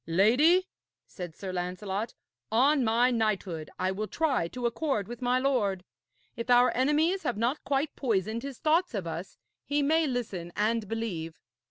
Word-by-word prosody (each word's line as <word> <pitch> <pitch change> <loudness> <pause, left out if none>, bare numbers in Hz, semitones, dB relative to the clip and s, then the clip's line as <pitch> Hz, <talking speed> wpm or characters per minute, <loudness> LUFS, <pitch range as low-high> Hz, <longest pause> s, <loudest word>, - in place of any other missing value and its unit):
'Lady,' 255 - +4 0.4
said 175 -4 -8
Sir 190 -2 -6
Lancelot, 190 +4 -3 0.4
'on 270 +5 +4
my 235 +3 +3
knighthood 200 -8 -1
I 185 - 0
will 210 +3 -3
try 275 - 0
to 245 +7 -5
accord 235 -4 -1
with 240 +1 -8
my 250 0 +2
lord. 230 -9 +1 0.5
If 235 0 -5
our 245 0 +5
enemies 305 +8 +2
have 240 - -2
not 240 +7 0
quite 280 +2 -1
poisoned 220 -2 -1
his 275 -1 -7
thoughts 325 -2 +1
of 195 -4 -3
us, 170 +3 -6 0.3
he 285 +1 0
may 320 +2 +3
listen 200 -10 -4
and 220 +1 0
believe.' 185 -8 -4
230 Hz, 160 wpm, -29 LUFS, 195-275 Hz, 0.5 s, our